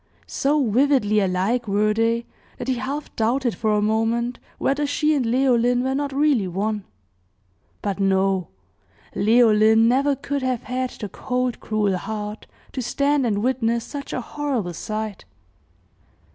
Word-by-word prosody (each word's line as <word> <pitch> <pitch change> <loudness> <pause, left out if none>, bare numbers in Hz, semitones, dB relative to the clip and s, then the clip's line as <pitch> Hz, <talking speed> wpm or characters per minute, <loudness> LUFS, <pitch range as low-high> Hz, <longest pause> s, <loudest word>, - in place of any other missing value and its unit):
So 280 -1 +1
vividly 235 -2 +3
alike 195 +5 0
were 210 +1 +2
they, 230 +1 +1 0.3
that 245 - -6
he 260 - +2
half 275 +4 -5
doubted 240 +2 +1
for 215 -1 0
a 210 0 +2
moment 225 +3 0 0.2
whether 285 +2 0
she 305 +2 +1
and 280 -4 +1
Leoline 245 0 +2
were 265 0 0
not 285 +1 -2
really 275 -7 +2
one; 205 +3 -2 1.0
but 200 -1 -2
no 190 -2 +1 0.7
Leoline 220 0 +5
never 275 +4 +3
could 280 +1 -3
have 255 -2 -1
had 255 0 -2
the 210 - -7
cold, 250 +4 -2
cruel 210 -3 0
heart 210 0 -6 0.2
to 260 - -4
stand 280 +2 +1
and 205 -1 0
witness 235 -2 0
such 285 -1 -7
a 255 - -2
horrible 250 -9 -3
sight. 215 +2 -5
235 Hz, 145 wpm, -23 LUFS, 210-265 Hz, 1.0 s, Leoline